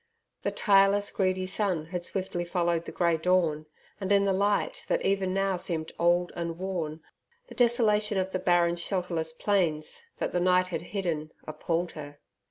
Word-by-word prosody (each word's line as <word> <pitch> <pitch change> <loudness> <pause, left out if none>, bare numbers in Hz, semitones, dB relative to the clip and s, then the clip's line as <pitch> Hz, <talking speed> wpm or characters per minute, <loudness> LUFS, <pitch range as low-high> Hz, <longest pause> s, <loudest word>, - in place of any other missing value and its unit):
The - - 0
tireless, 200 0 +4
greedy 185 -1 0
sun 185 -4 -1
had 175 +1 -5
swiftly 185 -1 -3
followed 170 -1 0
the - - -6
grey 170 -2 +1
dawn, 160 -3 +1 0.3
and 195 -1 -3
in 200 0 +4
the 195 - +2
light 205 - 0
that - - 0
even 195 -1 +1
now 195 0 0
seemed 160 -3 -2
old 175 +1 +2
and 170 -1 -4
worn, 170 -4 -4 0.5
the - - -9
desolation 215 -4 +2
of 190 0 -1
the 185 - -1
barren 175 -1 +2
shelterless 170 -3 -2
plains, 165 - 0 0.2
that - - -2
the 180 - 0
night 180 0 +3
had 180 - -3
hidden, 170 -5 -3
appalled 165 +3 -2
her. 145 -2 -9
180 Hz, 170 wpm, -28 LUFS, 170-195 Hz, 0.5 s, tireless